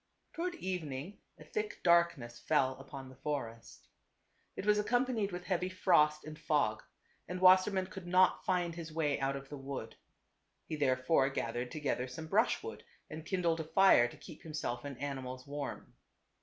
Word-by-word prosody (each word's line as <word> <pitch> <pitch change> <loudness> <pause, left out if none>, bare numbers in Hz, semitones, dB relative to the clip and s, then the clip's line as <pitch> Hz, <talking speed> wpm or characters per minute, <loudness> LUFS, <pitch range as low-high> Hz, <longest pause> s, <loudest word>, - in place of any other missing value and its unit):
Toward 345 +1 -3
evening 180 - -5 0.2
a - - -12
thick 425 -1 -4
darkness 170 -9 +3
fell 145 -4 +2
upon 135 0 -9
the 130 0 -14
forest. 130 -5 -5 0.7
It - - -5
was 210 0 +4
ac 210 - -2
companied 245 -5 +1
with 180 0 -5
heavy 185 -1 -1
frost 155 -5 +3
and 155 0 -8
fog, 145 -10 +1 0.5
and 180 +2 -4
Wasser 185 +1 +7
mann 190 -2 -1
could 185 -1 -9
not 185 +1 +4
find 180 -3 0
his 165 -1 -7
way 155 -2 0
out 135 0 0
of 135 0 -8
the 145 - -7
wood. 135 -4 -6 0.7
He 155 - -4
therefore 135 0 +2
gathered 120 -1 -3
together 140 -4 -2
some 145 +6 -7
brushwood 225 - 0 0.3
and 155 +1 -6
kindled 170 -4 +1
a - - -1
fire 160 -7 +5
to - - -12
keep 160 - -12
himself 150 -6 -4
and 140 -3 -6
animals 130 -2 -5
warm. 145 -1 -6
155 Hz, 170 wpm, -33 LUFS, 135-185 Hz, 0.7 s, Wasser